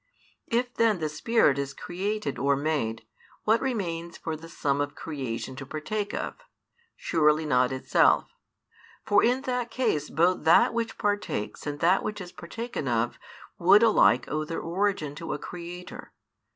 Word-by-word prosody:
If 245 +1 0
then 225 -4 +3
the 155 -2 -2
Spirit 150 - +2
is 140 0 -4
created 195 -2 -3
or 140 0 +3
made, 135 -7 -2 0.4
what 220 +2 +3
remains 170 -10 -3
for 160 - -4
the 165 +2 -11
sum 145 -3 0
of 145 0 -3
creation 130 -4 -5
to 140 - -6
partake 200 +8 -3
of? - - -4 0.6
Surely 155 -1 +2
not 125 -3 +2
itself! 130 0 +3 0.8
For 205 0 +4
in 245 +3 +3
that 250 -2 -2
case 190 - 0
both 175 +2 +2
that 160 +7 +5
which 230 -1 -2
partakes 205 - -2
and 145 0 -4
that 180 +3 +4
which 210 0 -4
is 180 -2 -8
partaken 225 - -6
of 120 -1 0 0.4
would 195 +5 +6
alike 225 -2 +5
owe 155 0 -2
their 165 +2 -4
origin 175 -4 -1
to 165 - -4
a - - -2
creator. 175 +3 -8
170 Hz, 155 wpm, -27 LUFS, 145-210 Hz, 0.8 s, would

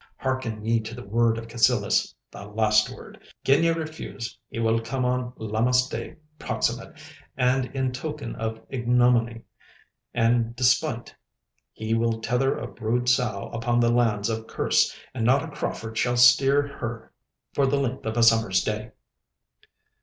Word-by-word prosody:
'Hearken 130 -5 -3
ye 115 0 +2
to 110 +1 -7
the 120 - -9
word 115 +2 +2
of 115 0 -7
Cassillis—the 115 -3 0
last 105 -1 +3
word—gin 135 +4 -2
ye 165 - +4
refuse 155 -8 -4
he - - -8
will 115 0 +2
come 130 +2 -2
on 125 0 -1
Lammas 120 +4 +1
day - - -6 0.2
proximate, - - -2 0.4
and 125 0 +2
in 130 -1 0
token 145 -1 -5
of 110 0 -4
ignominy 120 -2 +2 0.7
and 115 0 +1
despite, 120 -1 +1 0.6
he 110 - -3
will 115 0 +1
tether 125 +4 0
a - - -5
brood 120 +2 -2
sow 125 -5 0
upon 120 +1 0
the 120 0 +3
lands 115 -4 +2
of 110 0 -3
Kerse, - - +2 0.2
and 125 -3 -3
not 130 +4 +3
a - - -6
Crauford 110 0 -4
shall 120 0 +1
steer 135 +3 +6 0.2
her 115 -1 -6 0.4
for 140 -1 +2
the 140 +2 +1
length 130 -3 -2
of 110 +1 -2
a 120 - +4
summer's 115 -5 +4
day. 110 +2 -4
120 Hz, 150 wpm, -25 LUFS, 115-125 Hz, 0.7 s, steer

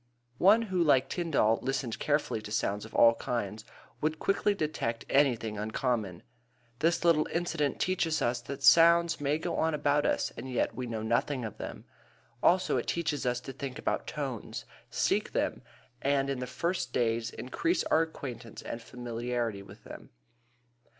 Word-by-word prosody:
One 210 +5 +6
who 185 -5 -1
like 135 -5 +4
Tyndall 145 -11 +2
listened 130 -3 -2
carefully 145 -6 0
to 105 0 -9
sounds 105 -1 -1
of 110 - -12
all 115 0 +7
kinds 110 -3 -3 0.4
would 155 +1 0
quickly 200 +4 +1
detect 135 -9 -2
anything 120 -7 +2
uncommon. 110 -4 -2 0.6
This 165 +1 +1
little 160 -3 +4
incident 170 -4 -1
teaches 170 -4 +1
us 120 +1 0
that 140 +3 -7
sounds 170 +3 +6
may 145 +1 +1
go 170 +2 -3
on 160 -1 +1
about 145 0 +2
us - - 0
and 130 - -7
yet 125 - 0
we 125 -1 -4
know 110 -2 -4
nothing 120 +3 0
of 110 - -8
them. - - -7 0.6
Also 185 +1 +3
it - - -3
teaches 150 -5 -1
us 125 0 +1
to 135 +2 -8
think 135 -1 -6
about - - -2
tones, - - -5 0.2
seek - - 0
them, - - -1 0.4
and 140 0 +1
in 135 - -3
the 125 - -4
first 130 +1 -2
days 115 -1 +1
increase 165 +7 -1
our 160 - +3
acquaintance 125 -8 -6
and 115 - -5
familiarity 120 -3 -3
with 100 - -14
them. - - -11
135 Hz, 165 wpm, -30 LUFS, 115-160 Hz, 0.6 s, all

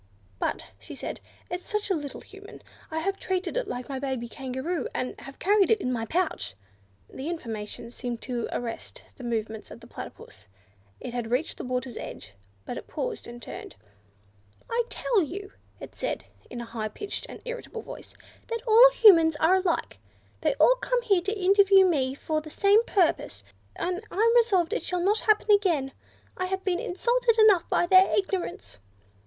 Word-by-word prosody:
"But," - - -2
she 110 - -9
said, - - -6 0.3
"it's 355 0 -5
such 420 -1 -1
a - - +5
little 290 -5 -5
Human! 405 +2 -13 0.3
I 315 - -4
have 390 +4 -1
treated 370 0 -2
it - - -1
like 245 0 -5
my 270 -2 -4
baby 260 -3 -3
Kangaroo, 265 +8 -3
and 255 - -2
have 275 - -11
carried 400 0 +3
it 445 - +4
in 255 -9 -1
my 225 -2 -2
pouch." 340 - -1 0.5
This 265 +3 -7
information 230 -7 -6
seemed 240 -1 -5
to 240 -3 -3
arrest 235 -2 -5
the 255 - -10
movements 220 -2 -3
of - - -10
the - - -14
Platypus; 95 +2 -11 0.5
it 240 - -7
had 240 -2 -3
reached 255 +6 -1
the - - -4
water's 250 -1 -3
edge, 100 0 -8 0.3
but 245 - -5
it - - -8
paused, - - -4
and 240 0 -9
turned. - - -8 0.9
"I 465 +1 +1
tell 465 -6 +1
you," 395 +6 -5 0.3
it - - -10
said - - -3 0.3
in 240 - -6
a - - -6
high 225 -1 -4
pitched 400 - -6
and - - -9
irritable 485 -1 -6
voice, - - -10 0.3
"that 465 +1 -5
all 460 +3 +9
Humans 330 -10 +7
are 320 +4 +3
alike! 370 -3 0 0.4
They - - +1
all - - +5
come - - 0
here 395 -6 +3
to 400 +4 -3
interview 390 0 +6
me 270 -7 +1
for 310 +2 -2
the 310 - -10
same 405 +7 +4
purpose, 320 - +1 0.3
and 360 +2 -2
I'm 455 +4 +3
resolved 425 -6 +3
it 465 - -1
shall 360 - -2
not 415 +3 +3
happen 425 -1 +3
again; 345 -10 +3 0.5
I 370 - -1
have 380 +1 -3
been 360 -2 +1
insulted 475 +5 +1
enough 425 -5 +5
by - - +2
their 375 +2 +6
ignorance." 355 - -3
355 Hz, 180 wpm, -27 LUFS, 255-410 Hz, 0.9 s, all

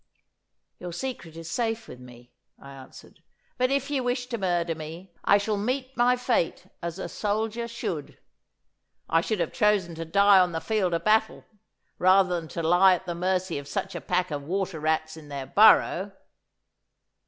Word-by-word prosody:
'Your 175 0 -6
secret 170 -5 -6
is 165 -1 -8
safe 230 +1 -2
with 125 - -11
me,' 125 -1 -15 0.2
I 140 - -13
answered. 135 -1 -14 0.4
'But 255 0 +2
if 275 +1 -1
ye 275 -2 0
wish 245 0 -1
to 235 -2 -3
murder 175 -3 0
me, 165 +3 -9
I 200 - +5
shall 205 +1 -1
meet 255 +5 -3
my 245 +1 +4
fate 245 -8 -1 0.2
as 170 0 -5
a 190 - -5
soldier 220 +2 -2
should. 175 -10 -5 0.9
I 165 0 +3
should 215 +3 -2
have 170 - -2
chosen 205 -5 +2
to 165 0 -6
die 200 +3 +5
on 180 -2 +2
the 165 - -1
field 190 -3 0
of 165 - -3
battle, 220 +1 +1 0.5
rather 185 0 +4
than 165 - -10
to 170 - -4
lie 180 +3 +5
at 185 - -9
the 175 - -3
mercy 180 -1 -1
of 140 - -10
such 195 +4 -3
a - - -5
pack 180 -1 -1
of 145 -1 -3
water 185 +2 -3
rats 160 +1 -1
in 150 -2 -12
their 140 -2 -5
burrow. 200 +2 +4
185 Hz, 180 wpm, -26 LUFS, 165-220 Hz, 0.9 s, I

